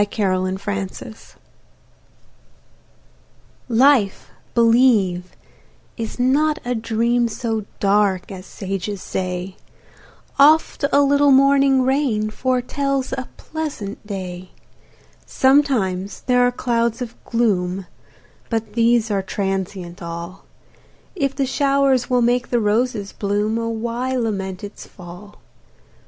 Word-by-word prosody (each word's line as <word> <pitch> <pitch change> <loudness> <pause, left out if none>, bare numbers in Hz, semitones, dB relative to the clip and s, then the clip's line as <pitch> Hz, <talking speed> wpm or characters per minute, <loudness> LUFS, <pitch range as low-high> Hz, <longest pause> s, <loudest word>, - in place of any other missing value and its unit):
Charlotte 185 -3 0
Brontë 195 -1 -4
Life 220 -2 -13 2.3
LIFE, 240 -4 +3 0.2
believe, 225 -7 +3 0.6
is 225 -2 -5
not 295 +5 +2
a 250 - 0
dream, 235 +1 +1
So 225 -2 -3
dark 200 -2 +1
as 185 -1 -9
sages 195 +1 -4
say; 185 0 -4 0.8
Oft 305 0 +4
a 285 - +5
little 285 +1 +4
morning 275 -1 +5
rain 255 -6 0
Foretells 260 +2 -1
a 260 -1 -4
pleasant 295 -11 -6
day: 185 -3 -6 0.8
Sometimes 245 -9 +1
there 250 -1 +2
are - - +1
clouds 235 0 -1
of 235 -1 -9
gloom, 195 -5 0 0.6
But 225 -2 -3
these 230 -1 +2
are 200 -1 +1
transient 190 -2 -4
all; 170 +2 -7 0.7
If 275 -6 -1
the 275 - 0
shower 275 0 +2
will 250 -1 +3
make 240 +1 +1
the 240 - +1
roses 215 -1 0
bloom, 210 +2 -1
Oh, 230 0 -2
why 235 +3 -2
lament 195 -6 -3
its 205 0 -9
fall? 180 +3 -12
225 Hz, 110 wpm, -20 LUFS, 195-255 Hz, 2.3 s, a